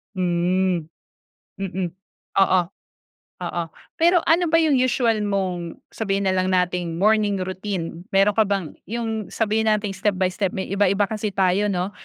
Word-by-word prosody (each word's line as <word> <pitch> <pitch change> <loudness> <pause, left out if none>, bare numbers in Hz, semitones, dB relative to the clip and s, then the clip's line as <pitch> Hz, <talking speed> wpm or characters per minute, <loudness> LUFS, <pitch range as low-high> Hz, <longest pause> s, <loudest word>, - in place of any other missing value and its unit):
Hmm, 180 -1 +1 0.7
mm, 190 -2 -2 0.5
oo. 185 -1 +4 0.8
Oo, 175 -1 -2 0.3
pero 345 +1 +4
ano 345 +2 +4
ba 330 0 +3
yung 300 -4 +3
usual 245 -3 +2
mong 185 -4 -3
sabihin 200 -2 -1
na 190 - +2
lang 185 0 +1
nating 180 -2 0
morning 210 -2 +3
routine, 185 -2 -5
mayro'n 195 +1 +5
ka 220 +1 +3
bang 195 -6 -3
yung 225 -2 -3
sabihin 220 0 0
nating 210 -2 +1
step 195 +1 0
by 185 0 +1
step. 190 0 -2
May 190 - -4
iba-iba 200 0 +2
kasi 215 -2 -3
tayo 190 +2 +2
'no 190 -1 -1
195 Hz, 150 wpm, -23 LUFS, 185-215 Hz, 0.8 s, mayro'n